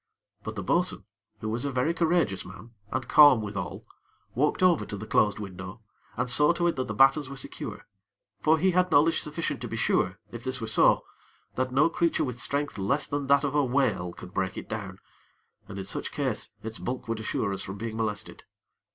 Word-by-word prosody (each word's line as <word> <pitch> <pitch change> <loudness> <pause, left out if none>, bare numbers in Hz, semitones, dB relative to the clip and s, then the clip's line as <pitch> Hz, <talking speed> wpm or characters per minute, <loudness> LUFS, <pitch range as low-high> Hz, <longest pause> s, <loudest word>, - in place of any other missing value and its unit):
But - - -5
the - - -4
bo'sun, - - 0 0.4
who 110 - -3
was 115 +2 -2
a 140 - -1
very 130 +6 +1
courageous 165 - +1
man, 100 +5 -12 0.2
and 130 0 -2
calm 145 -5 +8
withal, 100 -7 -5 0.5
walked 150 +8 +1
over 180 -4 +4
to 105 - -6
the 105 - -7
closed 105 -1 +2
window, 95 +2 -8 0.3
and 125 +2 0
saw 150 +6 +5
to 175 0 -1
it 170 - +2
that 130 - -1
the - - -4
battens 135 +1 +4
were 140 - -7
secure; - - -7 0.6
for 160 +1 +4
he 185 +4 +3
had 180 0 +2
knowledge 160 +1 +4
sufficient 155 +2 -3
to - - -4
be - - -5
sure, 90 +2 +1
if 120 -1 -8
this 130 0 -2
were 115 - -3
so, 110 - +4 0.5
that 130 0 -1
no 140 +5 +4
creature 170 0 +1
with 125 -2 -4
strength 140 -5 -2
less 140 +10 +1
than 145 -1 -3
that 140 +1 +4
of 140 -1 -1
a 145 -1 +3
whale 125 -9 +1
could 90 - -12
break 95 -1 -2
it - - -6
down, 100 -4 -5 0.7
and 100 - -8
in 95 - -5
such - - -4
case - - -2
its 110 0 -6
bulk 125 -1 -4
would 115 -1 -2
assure 110 -2 -1
us 95 - -3
from 95 +2 -6
being 110 +1 -5
molested. 105 -2 -4
125 Hz, 210 wpm, -27 LUFS, 105-145 Hz, 0.7 s, calm